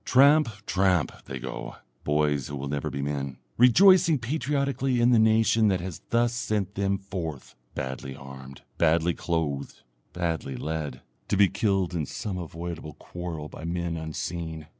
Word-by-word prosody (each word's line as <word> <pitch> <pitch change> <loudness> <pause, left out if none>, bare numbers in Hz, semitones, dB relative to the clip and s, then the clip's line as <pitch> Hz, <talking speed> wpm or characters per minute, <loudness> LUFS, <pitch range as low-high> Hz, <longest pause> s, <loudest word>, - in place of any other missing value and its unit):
Tramp, 140 +1 +5 0.2
tramp, 90 -5 +2
they 70 - -5
go, 65 +1 -6 0.3
boys 75 -2 +1
who 75 - -5
will 70 0 -4
never 70 0 -2
be 70 - -4
men, 70 -2 -3 0.2
rejoicing 165 - +6
patriotically 135 0 0
in 120 +1 +5
the 120 - +6
nation 110 0 +4
that 95 -3 +2
has 90 -2 -6
thus 120 0 +2
sent 105 -5 -1
them 100 -1 0
forth, 85 -7 -6 0.2
badly 65 0 -4
armed, 65 0 -11 0.2
badly 85 +1 +3
clothed, 80 -6 -3 0.3
badly 80 -6 -2
led, 75 -5 -4 0.3
to 100 - +1
be 100 0 +7
killed 95 -2 0
in 80 -5 -2
some 105 -7 -4
avoidable 85 -2 -6
quarrel 85 -1 -6
by 80 - -10
men 85 0 -2
unseen. 80 0 -4
85 Hz, 150 wpm, -27 LUFS, 75-110 Hz, 0.3 s, be